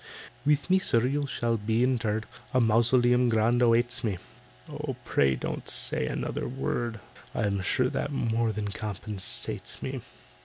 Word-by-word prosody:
"With 150 -1 +3
me, 185 +1 +4
sir, 120 -9 +2
you 140 +2 0
shall 115 -3 0
be 110 +3 +1
interred, 115 -4 +1 0.3
A - - +6
mausoleum 120 +2 +4
grand 115 +2 +3
awaits 120 +1 +3
me." 105 -5 0 0.5
"Oh, - - -4
pray 70 -2 +3
don't - - -4
say - - -1
another - - -2
word, 120 -3 -2 0.4
I'm 100 -2 0
sure 125 +7 +2
that 145 - -2
more 115 -4 +1
than 105 -1 -3
compensates 100 -1 -4
me. - - -3
115 Hz, 145 wpm, -28 LUFS, 110-125 Hz, 0.5 s, A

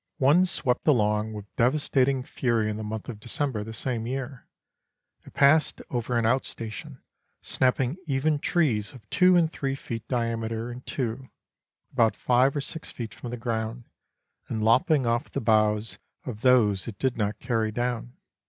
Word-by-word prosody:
One 155 +8 +5
swept 130 -7 -1
along 105 -5 +2
with 105 -1 -10
de 120 0 +5
vastating 135 -2 +1
fury 115 -6 0
in 105 - -4
the 110 - -5
month 110 0 -5
of 110 -4 -7
December 120 -1 -2
the 110 - -7
same 115 +1 -2
year. 130 0 -5 0.8
It - - -15
passed 150 +3 +4
over 120 0 -1
an 115 - +1
out 130 +4 +3
station, 110 -3 -8 0.4
snapping 130 +3 0
even 145 +2 +1
trees 135 -11 +1
of 125 -4 -14
two 185 0 +5
and 165 -2 +3
three 135 -3 -2
feet 115 -4 -6
diameter 115 -1 -2
in 120 +1 -8
two, 130 0 -3 0.6
about 115 -4 +3
five 130 +3 +3
or 145 - 0
six 160 +3 -6
feet 115 -5 -6
from 120 - -8
the 120 - -4
ground, 115 0 -3 0.6
and 110 -2 -2
lop 115 +3 +4
ping 145 -5 +3
off 115 +1 0
the - - -2
boughs 110 -1 +2 0.3
of 110 -5 -6
those 115 -7 +4
it 110 -4 -6
did 130 +1 0
not 105 -1 -1
carry 110 -2 -1
down. 120 +1 -2
120 Hz, 170 wpm, -26 LUFS, 110-135 Hz, 0.8 s, One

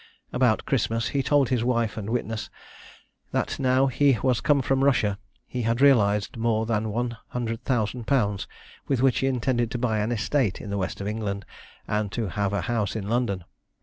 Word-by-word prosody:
About - - +2
Christmas 115 0 0
he 140 - 0
told 140 -1 +3
his 125 -3 +1
wife 115 -3 0
and 110 -1 -5
witness, 115 -2 -2 0.8
that - - -1
now 130 0 +3
he 135 0 +3
was 130 -3 +2
come 145 -3 +3
from 135 +1 +1
Russia 105 -7 +2 0.3
he 125 - -4
had 115 +1 0
realised 105 -7 +4
more 115 -1 +1
than 110 -1 0
100,000_l_., 115 -1 -1 0.4
with 135 -3 +1
which 135 -2 +3
he 135 - +1
intended 120 -2 0
to 125 - -3
buy 115 -3 0
an 105 +3 -1
estate 120 -2 0
in 105 - -7
the 100 - -1
west 95 - -3
of 100 - -3
England, 105 -2 -3 0.4
and 105 -1 -1
to 115 -5 -2
have 100 +1 -1
a 100 - 0
house 115 -5 -1
in 105 -2 -4
London. 115 -6 0
115 Hz, 180 wpm, -25 LUFS, 105-125 Hz, 0.8 s, realised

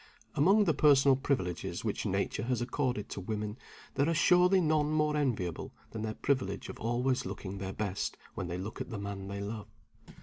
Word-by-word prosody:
Among 195 +9 +5
the 170 -5 +3
personal 140 -2 +6
privileges 125 -10 -2
which - - -1
Nature 110 - -1
has 125 -1 0
accorded 125 -3 -1
to 100 - -5
women, 105 +3 -4 0.3
there 140 +4 +2
are 165 - +1
surely 180 +3 +5
none 155 -3 +2
more 150 -1 +2
enviable 110 - -1 0.2
than 110 - -5
their 110 0 -3
privilege 115 -8 -1
of - - -8
always 125 +3 +1
looking 95 0 -6
their 95 0 -3
best 100 -1 -2 0.2
when 95 - -4
they 90 0 -3
look 100 +5 -5
at - - -5
the 115 - -4
man 100 -1 -5
they 100 0 -4
love. 105 +1 -5
120 Hz, 190 wpm, -31 LUFS, 100-145 Hz, 0.3 s, personal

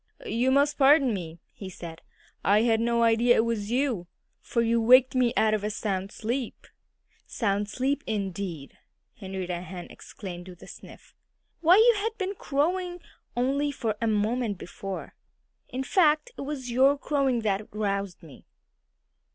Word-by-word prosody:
"You 250 - +1
must 285 +3 +2
pardon 275 -3 +5
me," 170 -3 -6
he 195 - -9
said. 170 -2 -9 0.4
"I 205 +3 +4
had 225 -2 +3
no 235 0 +1
idea 230 +1 +4
it 225 - +3
was 220 -3 -2
you, 240 -8 0 0.3
for 235 - -1
you 230 0 +2
waked 255 +3 +6
me 250 -2 +2
out 220 -1 +3
of 210 -1 -1
a 210 - -1
sound 195 -2 -3
sleep." 235 +3 -4 0.6
"Sound 205 -2 -1
sleep, 275 +5 -1
indeed!" 190 -8 -4 0.4
Henrietta 190 -3 -5
Hen 180 -1 -8
exclaimed 180 -3 -9
with 175 -1 -13
a - - -12
sniff. - - -13 0.5
"Why, 345 +2 +6
you 460 +3 +6
had 450 +1 -3
been 385 -1 -2
crowing 355 +3 -1 0.4
only 275 +4 +1
a - - -5
few 225 -4 -2
moments 215 0 0
before. 190 +2 -7 0.6
In 260 +1 -3
fact 310 - +2
it - - -7
was 275 -3 -5
your 270 +4 +4
crowing 275 -4 0
that 210 -1 -1
roused 200 -3 -3
me." 155 -5 -15
230 Hz, 155 wpm, -27 LUFS, 200-275 Hz, 0.6 s, waked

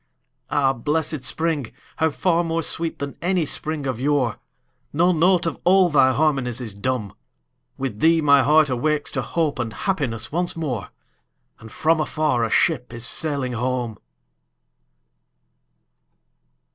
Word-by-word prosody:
Ah, 135 -2 +2
blessed 150 +3 -2
spring!—how 160 +1 -2
far 170 +2 +1
more 165 0 -1
sweet 165 +2 -1
than 140 -1 -5
any 180 -2 +1
spring 150 0 -4
of 130 -4 -2
yore! 135 -6 +1 0.5
No 175 +5 +3
note 175 +1 +3
of 165 - -3
all 185 0 +5
thy 135 -4 +4
harmonies 135 -4 0
is 115 -5 -5
dumb; 105 0 -3 0.6
With 130 -6 -4
thee 165 +4 +4
my 140 -2 +5
heart 150 +1 +4
awakes 150 +4 0
to - - -2
hope 155 -5 -1
and 120 -2 -2
happiness 125 - -2
once 175 +3 0
more, 130 - -4 0.7
And 110 -1 -12
from 160 +5 +1
afar 155 -5 0
a 115 - 0
ship 130 -5 +1
is 120 0 -4
sailing 140 -3 -1
home! 120 -2 -2
145 Hz, 135 wpm, -22 LUFS, 125-160 Hz, 0.7 s, all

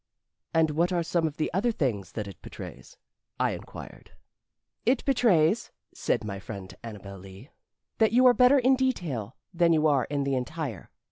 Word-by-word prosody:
"And 160 -1 +3
what 170 +4 +1
are 175 -2 +1
some 165 0 +1
of 150 - -7
the 155 - -2
other 215 +7 +2
things 120 - -2
that 105 -2 -4
it 100 - -11
betrays?" - - -10 0.4
I - - +2
inquired. - - -10 0.7
"It 255 +1 +1
betrays," 220 - +3 0.2
said - - -1
my 100 -2 -5
friend 100 -2 -8
Annabel 100 -4 -8
Lee, 95 - -13 0.5
"that 220 -1 +4
you 250 +3 +5
are 250 - +8
better 250 +3 +6
in 260 +1 +4
detail 165 - -2 0.2
than 170 -1 +4
you 155 -1 +2
are 140 -5 +3
in 145 -1 -2
the 140 0 -1
entire. 130 - -4
155 Hz, 175 wpm, -27 LUFS, -, 0.7 s, are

